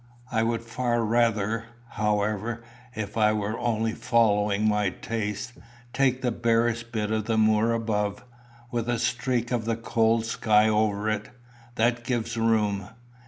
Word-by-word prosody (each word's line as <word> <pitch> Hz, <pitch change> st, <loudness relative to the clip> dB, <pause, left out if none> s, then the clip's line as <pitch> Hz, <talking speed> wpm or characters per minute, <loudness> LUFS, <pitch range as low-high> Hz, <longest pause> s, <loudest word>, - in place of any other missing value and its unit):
I 110 Hz, -, +1 dB
would 115 Hz, 0 st, 0 dB
far 120 Hz, 0 st, -1 dB
rather, 115 Hz, -1 st, +1 dB, 0.2 s
however, 105 Hz, +2 st, -1 dB, 0.3 s
if 110 Hz, 0 st, -5 dB
I 105 Hz, -1 st, +4 dB
were 110 Hz, +2 st, -2 dB
only 115 Hz, -2 st, 0 dB
following 105 Hz, -4 st, +2 dB
my 105 Hz, -2 st, +2 dB
taste, 105 Hz, +3 st, -4 dB, 0.4 s
take 130 Hz, -1 st, +1 dB
the 125 Hz, -, +1 dB
barest 115 Hz, 0 st, 0 dB
bit 110 Hz, -2 st, -2 dB
of 110 Hz, -1 st, 0 dB
the 115 Hz, -1 st, 0 dB
moor 110 Hz, +1 st, +3 dB
above, 110 Hz, -2 st, -1 dB, 0.5 s
with 120 Hz, -1 st, -2 dB
a 120 Hz, -, +1 dB
streak 120 Hz, +1 st, -1 dB
of 120 Hz, -3 st, -1 dB
the 115 Hz, 0 st, -1 dB
cold 115 Hz, 0 st, +1 dB
sky 110 Hz, -1 st, +3 dB
over 105 Hz, -1 st, +1 dB
it. 110 Hz, -1 st, -2 dB, 0.5 s
That 120 Hz, +1 st, +1 dB
gives 120 Hz, -2 st, -2 dB
room." 105 Hz, -4 st, +1 dB
110 Hz, 145 wpm, -26 LUFS, 105-115 Hz, 0.5 s, I